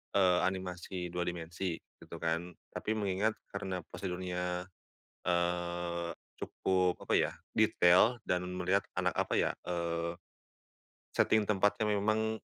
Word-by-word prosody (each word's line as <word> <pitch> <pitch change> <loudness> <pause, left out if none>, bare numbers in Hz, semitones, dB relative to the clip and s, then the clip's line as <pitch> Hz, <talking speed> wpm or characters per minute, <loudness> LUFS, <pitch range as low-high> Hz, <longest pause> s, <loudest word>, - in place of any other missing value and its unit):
eee, 90 -2 +5
animasi 90 -1 -4
2 90 0 -1
dimensi 85 +1 -3 0.2
gitu - - -9
kan. 85 +2 0 0.2
Tapi 110 - -2
mengingat 105 +1 +1 0.2
karena 95 -3 -3
pasar 90 0 -4
dunia, 90 -1 -2 0.6
eee, 85 -1 0 0.3
cukup 90 -1 +1
apa - - 0
ya, - - +4 0.2
detail 90 +8 +5
dan 90 0 +1 0.2
melihat 95 +2 +2 0.2
anak, - - +1
apa - - 0
ya, - - +3 0.2
eee, 85 0 -1 1.0
setting 110 -2 +4
tempatnya 105 +1 +2
memang, 110 +2 +1
90 Hz, 120 wpm, -33 LUFS, 85-100 Hz, 1.0 s, eee